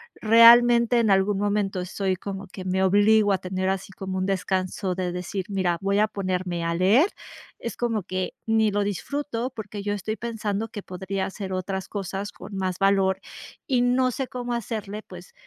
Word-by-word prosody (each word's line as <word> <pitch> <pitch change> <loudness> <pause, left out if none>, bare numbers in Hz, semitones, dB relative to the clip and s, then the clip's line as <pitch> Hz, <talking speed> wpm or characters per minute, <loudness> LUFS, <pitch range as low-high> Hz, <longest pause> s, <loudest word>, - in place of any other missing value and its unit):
realmente 235 +1 +6
en 220 -3 +3
algún 195 +1 +3
momento 205 -2 0
estoy 190 +1 -2
como 195 +1 -7
que 185 0 -9
me 190 +1 0
obligo 205 +2 +4
a 190 - +2
tener 185 0 -2
así 195 0 -3
como 190 0 -5
un 185 - 0
descanso 185 -1 -1
de 180 -1 -2
decir: 180 +1 -4
"Mira, 185 -4 0
voy 200 +1 +1
a 215 - +4
ponerme 185 -4 -2
a 170 - 0
leer". 215 - +4 0.5
Es 235 - -6
como 230 -3 0
que 185 0 -3
ni 220 -1 +3
lo 205 0 +1
disfruto 245 +4 -3
porque 210 -3 -7
yo 205 0 -1
estoy 210 +2 -3
pensando 225 -2 -3
que 210 -2 -7
podría 190 +1 -4
hacer 190 -1 -6
otras 190 +1 -3
cosas 200 0 -4
con 200 - -10
más 185 -1 -2
valor 195 -1 +3 0.5
y 255 -3 +2
no 255 +1 +3
sé 265 +2 -3
cómo 245 -1 -4
hacerle, 215 -2 -4
pues 180 -1 -12
200 Hz, 180 wpm, -25 LUFS, 190-220 Hz, 0.5 s, realmente